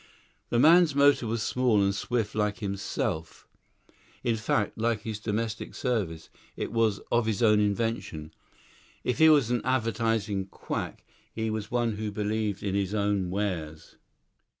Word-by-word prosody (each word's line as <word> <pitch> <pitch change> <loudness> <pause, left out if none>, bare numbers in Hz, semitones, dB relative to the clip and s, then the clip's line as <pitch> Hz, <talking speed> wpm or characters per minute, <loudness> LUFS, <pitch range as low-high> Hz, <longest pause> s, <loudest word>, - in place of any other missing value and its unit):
The 120 - +1
man's 160 +3 +6
motor 140 -4 +4
was 110 0 -1
small 125 -4 +2
and 100 0 +2
swift 110 +1 -2
like 105 -1 0
himself; 95 -5 -3 0.8
in 120 -1 +1
fact, 105 -1 0
like 115 -1 0
his 110 -2 -4
domestic 110 +1 -3
service, 100 - -2 0.3
it - - -3
was 115 -3 +2
of 120 -1 +2
his 110 +1 0
own 105 -2 +5
invention. 105 -7 -2 0.7
If 125 - -1
he 160 0 +8
was 140 -6 +4
an 120 - +1
advertising 115 -5 0
quack, - - -5 0.3
he 110 0 -2
was 110 -1 -4
one 120 -3 0
who 110 0 -3
believed 105 -1 -2
in 100 -2 -1
his 100 +1 -1
own 100 -3 0
wares. 90 -6 -4
110 Hz, 150 wpm, -28 LUFS, 100-115 Hz, 0.8 s, he